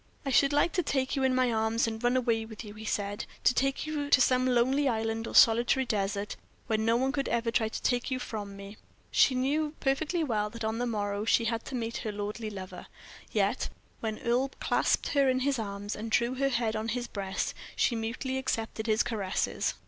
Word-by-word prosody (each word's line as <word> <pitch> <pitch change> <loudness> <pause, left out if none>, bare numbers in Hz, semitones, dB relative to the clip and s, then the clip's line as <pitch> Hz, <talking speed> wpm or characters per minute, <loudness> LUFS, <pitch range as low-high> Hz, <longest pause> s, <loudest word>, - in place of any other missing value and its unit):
"I 275 - -1
should 275 +2 +4
like 290 +4 +3
to 370 - +2
take 270 -5 -1
you 270 - 0
in 260 -1 +2
my 255 -1 +3
arms 220 +1 +1
and 225 0 -4
run 245 +1 +3
away 230 -3 +1
with 220 0 -9
you," 210 -1 -9
he 215 +1 -9
said; 205 -1 -2 0.2
"to - - +5
take 275 +3 0
you 295 -2 -3
to 280 - +6
some 255 0 +3
lonely 260 +3 +3
island 225 -1 -1
or - - -6
solitary 235 +3 +5
desert, 200 -2 -2 0.3
where 220 -1 0
no 225 +1 +2
one 265 +2 +1
could 275 -1 -1
ever 235 0 0
try 225 -2 +1
to - - -5
take 245 0 +1
you 260 - -1
from 205 -5 -6
me." 200 +1 -10 0.3
She 260 - +4
knew 295 +4 0
perfectly 310 +5 0
well 215 -7 0
that 230 +2 -7
on 220 +1 -1
the 245 - 0
morrow 205 -2 -2
she 230 +1 +3
had 230 0 -2
to 270 - -5
meet 230 -1 -3
her 215 - -3
lordly 210 +2 -4
lover, 185 -3 -8 0.4
yet, - - +1 0.3
when 220 -1 -3
Earle 245 +3 +1
clasped - - +1
her 280 -2 +3
in 255 0 +1
his 275 -1 +1
arms, 205 -1 -4
and 220 +2 -5
drew 235 +2 +2
her 275 +1 +1
head 235 -3 0
on 215 +1 -2
his 240 +1 -2
breast, 195 -3 -3 0.2
she 240 - +2
mutely 240 +4 -2
accepted 225 -3 -2
his 220 +1 +3
caresses. 200 -5 -1
230 Hz, 215 wpm, -29 LUFS, 220-260 Hz, 0.4 s, to